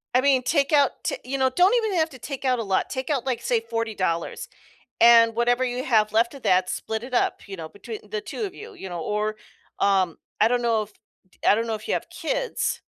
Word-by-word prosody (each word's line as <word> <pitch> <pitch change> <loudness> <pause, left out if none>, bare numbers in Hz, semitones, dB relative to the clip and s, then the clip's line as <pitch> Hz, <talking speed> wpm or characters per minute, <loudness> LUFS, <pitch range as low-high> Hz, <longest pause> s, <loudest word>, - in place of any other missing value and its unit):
I 255 - +5
mean, 265 -2 +3
take 280 +2 +1
out 285 -3 +5
t - - -1
you 275 +2 -2
know, 260 0 +3
don't 365 - +4
even 400 -5 0
have 320 0 +2
to 260 - -12
take 275 0 -6
out 255 -1 +2
a - - -1
lot, 195 -2 0
take 260 +1 -4
out, 270 -4 0
like, 245 -3 -1
say 235 -2 +1
$40, 220 - -2 0.5
and 230 -1 +7
whatever 245 +2 +2
you 250 +1 -2
have 215 -4 +2
left 235 +4 +2
of 275 - -11
that, 185 0 +3
split 220 +1 -3
it 255 0 -7
up, - - +1
you 195 -1 -7
know, 160 -2 -7
between 215 +4 -8
the 215 0 -2
2 445 - -6
of 385 - -4
you, 440 -1 -10
you 190 - -8
know, 175 -1 -5
or, 210 +4 -2 0.4
um, 190 -4 +2 0.2
I 220 - +6
don't 245 0 +1
know 225 -2 +2
if 210 0 -10 0.4
d - - -27
I - - +7
don't 230 +2 -1
know 220 - 0
if 215 - -12
you - - +1
have - - -4
kids - - -2
235 Hz, 245 wpm, -24 LUFS, 215-270 Hz, 0.5 s, and